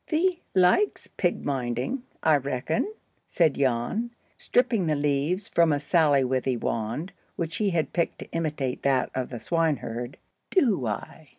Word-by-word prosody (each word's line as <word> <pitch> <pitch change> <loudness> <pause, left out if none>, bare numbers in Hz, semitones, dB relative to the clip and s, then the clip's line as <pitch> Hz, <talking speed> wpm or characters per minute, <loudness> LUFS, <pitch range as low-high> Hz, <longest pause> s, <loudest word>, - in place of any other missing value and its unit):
"Thee 345 +2 +1
likes 190 - +3
pig 175 -2 -2
minding, 130 - -2 0.2
I 155 -2 +5
reckon?" 140 - -1 0.4
said 160 -5 +3
Jan, 135 - 0 0.3
stripping 230 -7 +1
the 155 - +2
leaves 145 +7 0
from 170 -6 +3
a 145 - +2
sallywithy 135 -5 +2
wand, 115 - -3 0.2
which 165 -1 -3
he 210 -2 +1
had 170 -4 -1
picked 170 -2 0
to - - -10
imitate 150 -6 -2
that 135 -2 +1
of 130 -1 -2
the 120 - -6
swineherd. 135 -5 -1 0.3
"Do 220 - +2
I?" 110 +8 -5
150 Hz, 140 wpm, -26 LUFS, 130-180 Hz, 0.4 s, I